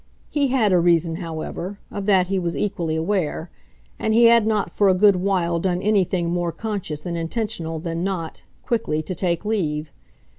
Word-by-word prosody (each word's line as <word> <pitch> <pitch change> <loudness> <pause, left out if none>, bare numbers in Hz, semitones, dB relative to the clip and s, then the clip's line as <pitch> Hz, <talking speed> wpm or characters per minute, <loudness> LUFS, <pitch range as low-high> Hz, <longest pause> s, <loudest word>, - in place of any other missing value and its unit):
He 285 -2 +2
had 240 -7 +2
a 180 - +5
reason, 170 -1 +2
however 170 +3 -5
of 200 0 -5
that 190 -3 +4
he 195 +1 -1
was 170 -2 -2
equally 180 -6 -1
aware; 165 -1 -1 0.5
and 220 0 +1
he 235 - +6
had 230 -2 +6
not 215 -2 0
for 200 -2 +3
a 185 - +4
good 200 0 +5
while 180 -3 0
done 180 0 0
anything 185 -4 +1
more 175 -1 -1
conscious 175 -5 -5
and 175 -1 -3
intentional 165 -1 -2
than 165 +1 -3
not, 180 -4 -3 0.2
quickly, 185 -10 -1
to 185 - -4
take 170 +1 -1
leave. 155 -8 -1
180 Hz, 180 wpm, -22 LUFS, 165-205 Hz, 0.5 s, he